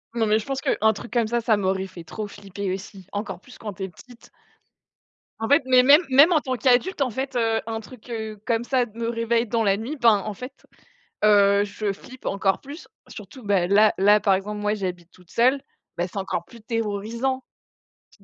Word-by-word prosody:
Non, 225 -1 +1
mais 215 +1 +3
je - - -8
pense 270 -1 -3
qu'un 220 -3 +2
truc 235 +4 -9
comme 235 -3 +2
ça, 235 +1 0
ça 225 -2 +2
m'aurait 190 -1 -1
fait 185 -3 -11
trop 210 +6 -6
flipper 200 -1 -5
aussi, 195 -1 -9
encore 205 -3 -4
plus 250 - -16
quand 210 -3 -6
tu 190 - -7
es 190 - -4
petite. 240 +7 -17 1.1
En 225 - -1
fait, 285 0 +4
mais 255 -1 +5
même 290 +5 +7
même 285 +7 +6
en 310 - +3
tant 260 -1 -2
qu'adulte, 260 - +2
en 260 - +2
fait, 265 +3 -4
heu, 225 -1 +1
un 225 0 -3
truc, 245 +1 -14
heu, 220 -2 -5
comme 235 0 0
ça 255 -2 +1
d 220 - -17
me 230 - -1
réveille 230 0 0
dans 230 0 0
la 200 -1 +2
nuit, 245 +8 -5
ben, 230 -6 +5
en 215 - -3
fait, 250 +6 -10 0.6
heu, 200 -1 +5
je 205 0 -3
flippe 255 +5 -13
encore 195 -1 0
plus. 290 +5 -10 0.2
Surtout, 260 -3 -11
bah, 195 -4 +1
là 210 +3 +4
là, 205 +2 +5
par 195 -1 +3
exemple, 210 +2 -3
moi, 210 +1 0
j'habite 180 -4 -5
toute 180 -2 -21
seule. 260 +4 +3 0.3
Bah, 175 - 0
c'est 190 +2 -7
encore 190 - -3
plus 235 - -15
terrorisant. 230 +4 -2 0.7
Tu - - -25
220 Hz, 215 wpm, -24 LUFS, 200-245 Hz, 1.1 s, même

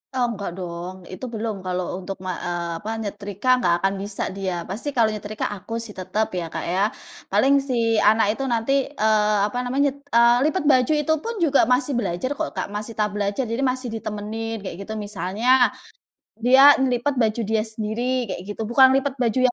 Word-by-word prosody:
Eee, 250 -2 +1
nggak 200 -2 -5
dong, 175 +1 -6
itu 185 +7 -7
belum 220 -1 -3
kalau 180 -1 -2
untuk 190 +1 -6
ma 185 - -1 0.2
eee, 175 -1 -3
apa 215 - -4
nyetrika 205 +1 -6 0.2
nggak 175 - +4
akan 195 +2 +1
bisa 205 0 -4
dia. 185 -3 -3
Pasti 230 +10 -4
kalau 235 -5 +3
nyetrika 210 0 -4
aku 205 +3 -9
sih 225 -3 -8
tetep 190 +4 -1
ya, 170 - -3
Kak, - - -4
ya. 180 +3 0 0.5
Paling 275 +1 +4
si 230 -3 +1
anak 220 0 +3
itu 270 - -4
nanti, 230 +4 0 0.2
eee, 215 -5 +2
apa 210 - -5
namanya 275 +3 +1
eee, 240 -4 +3 0.2
lipat 375 -2 -2
baju 255 -2 +4
itu 300 +2 +1
pun 465 - -3
juga 300 -5 +4
masih 250 +4 +1
belajar 205 0 -1
kok, - - -3
Kak, - - -4
masih 210 +2 -4
tahap 210 -2 -1
belajar 205 +4 -1
jadi 230 +4 -2
masih 255 0 -5
ditemenin 220 +1 -4
kayak 195 -4 -7
gitu 220 - -6
misalnya, 205 +2 -4 1.0
dia 270 +3 +8
ngelipet 265 +2 +1
baju 220 +1 0
dia 220 -1 +2
sendiri 220 +1 -3 0.3
kayak - - -5
gitu, 205 +2 -4
bukan 265 +2 +7
lipet 275 0 0
baju 240 0 +1
yang 250 - +4
220 Hz, 190 wpm, -23 LUFS, 200-250 Hz, 1.0 s, dia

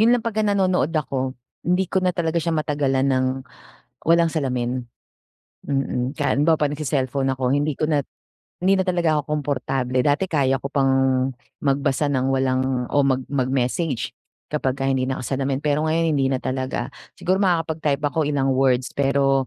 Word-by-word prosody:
'yon 235 +3 +5
lang 235 - -6
pagka 220 -2 -1
nanonood 190 -7 +2
ako, 130 -3 -2 0.2
hindi 180 +2 +1
ko 190 - +3
na 185 - +1
talaga 170 -1 0
siya 165 -1 -1
matagalan 145 -3 0
ng 130 -1 +2 0.8
walang 170 +1 +4
salamin. 130 -5 -1 0.8
Mm, 135 -2 -1
ka 145 - +1
halimbawa 155 +3 +3
kapag 150 -1 +1
nagse-cellphone 135 -2 -1
ako 130 0 +1
hindi 145 0 0
ko 155 - +1
na 150 -2 +2 0.6
hindi 190 +2 +3
na - - +3
talaga 170 -4 +2
ako - - -10 0.2
komportable. 130 -2 -1
Dati 145 +6 +2
kaya 135 -5 +2
ko 135 - -6
pang 135 -2 +2 0.7
magbasa 140 +1 +1
ng 130 -2 +1
walang 130 -1 0
o - - -1
mag 130 -1 +1
mag-message, 130 +1 0 0.4
kapagka 135 -2 -1
hindi 130 -1 +1
nakasalamin. 135 +1 -2
Pero 150 +1 +1
ngayon, 165 +1 +1
hindi 135 -1 +2
na 130 - 0
talaga, 130 -1 -2 0.3
siguro 185 +1 0
makakapag-type 160 -6 +1
ako 150 +2 0
ilang 140 -2 +1
words 130 -1 +2
pero 135 -1 +2
140 Hz, 160 wpm, -22 LUFS, 130-160 Hz, 0.8 s, yon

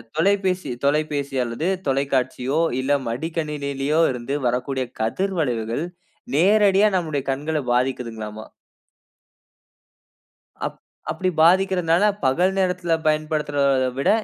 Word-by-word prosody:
தொலைபேசி 185 -1 +1 0.2
தொலைபேசி 145 -1 0
அல்லது 120 +8 -3 0.2
தொலைக்காட்சியோ 135 0 0 0.2
இல்ல 135 +2 +1 0.2
மடிக்கணினியிலோ 150 +1 -2
இருந்து 125 +2 -4
வரக்கூடிய 130 +2 -1 0.2
கதிர் 190 - -1
வளைவுகள், 120 -2 -1 0.5
நேரடியா 200 +4 +5
நம்முடைய 155 -6 -2
கண்கள 150 +4 -2 0.2
பாதிக்குதுங்களாம. 115 -4 -2 2.2
அப் - - -7 0.3
அப்படி 185 - -1
பாதிக்கிறதுனால, 180 0 +3 0.2
பகல் 175 +9 +3
நேரத்தில 180 -2 +1
பயன்படுத்துறதை 145 -4 +1
விட, 135 - +2
145 Hz, 90 wpm, -22 LUFS, 130-170 Hz, 2.2 s, நேரடியா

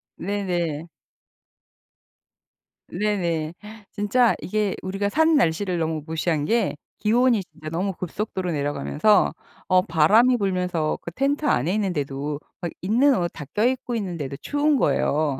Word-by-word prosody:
네네. 175 -5 -2 2.0
네네. 170 -5 -1 0.4
진짜 220 +4 +2
이게 210 -1 -1
우리가 195 +2 -1
산 320 +7 +3
날씨를 180 - +1
너무 160 -2 -2
무시한 160 -2 -1
게 230 -4 +1 0.2
기온이 235 +1 +3
진짜 160 -2 -10
너무 185 +5 -1
급속도로 185 +1 -4
내려가면서 145 +7 +2 0.3
어 185 0 +5
바람이 210 +8 +4
불면서 180 -6 -1
그 170 - -7
텐트 280 - 0
안에 165 - +2
있는데도 145 -7 -2 0.2
막 170 -2 -3
있는 250 +9 +3
옷 175 -1 0
다 150 - -8
껴입고 245 +2 0
있는데도 170 - -4
추운 290 0 +1
거예요. 145 - +1
185 Hz, 275 characters per minute, -24 LUFS, 160-215 Hz, 2.0 s, 어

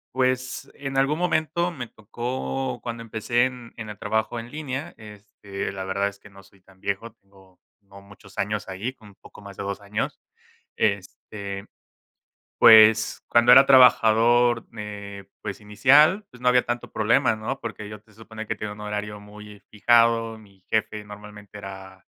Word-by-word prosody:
pues 130 +1 -1
en 135 -1 -6
algún 140 +3 +1
momento 170 0 0
me 125 -7 -7
tocó 125 +5 -4
cuando 115 -1 -5
empecé 115 +2 0
en 125 -2 -7
en 110 -2 -7
el 105 - -8
trabajo 110 +2 -2
en 115 +1 -10
línea, 145 -2 -5
este, 105 -2 -8
la 95 -1 -6
verdad 100 +1 0
es 100 0 -9
que 105 - -16
no 100 0 -16
soy 95 0 -24
tan 95 0 -23
viejo, 100 +4 -4
tengo 95 -3 -24 0.2
no 100 0 -16
muchos 100 0 -17
años 105 0 -2
ahí, 100 +8 -4
como 110 -5 -17
un - - -33
poco - - -16
más 100 -1 -12
de - - -5
2 100 0 -5
años. 100 +1 -4 0.6
Este, 100 -1 -3 0.9
pues 110 -1 +7
cuando 120 +1 +5
era 135 +2 +9
trabajador, 120 -2 +5
eh, 100 -2 -8 0.2
pues 100 - -6
inicial, 140 - +4
pues 125 - -16
no 125 - -2
había 125 0 +4
tanto 120 0 -4
problema, 110 0 +2
¿no? 110 +5 -5
Porque 105 -2 -7
yo 105 -1 -9
te 110 0 -25
supone 110 0 -10
que - - -2
tenía 105 -1 -6
un 105 - -10
horario 105 0 -5
muy 105 0 -13
fijado, 115 +1 +3
mi 100 -3 -20
jefe 105 -1 -1
normalmente 105 0 -12
era, 95 -1 -10
110 Hz, 170 wpm, -24 LUFS, 100-120 Hz, 0.9 s, era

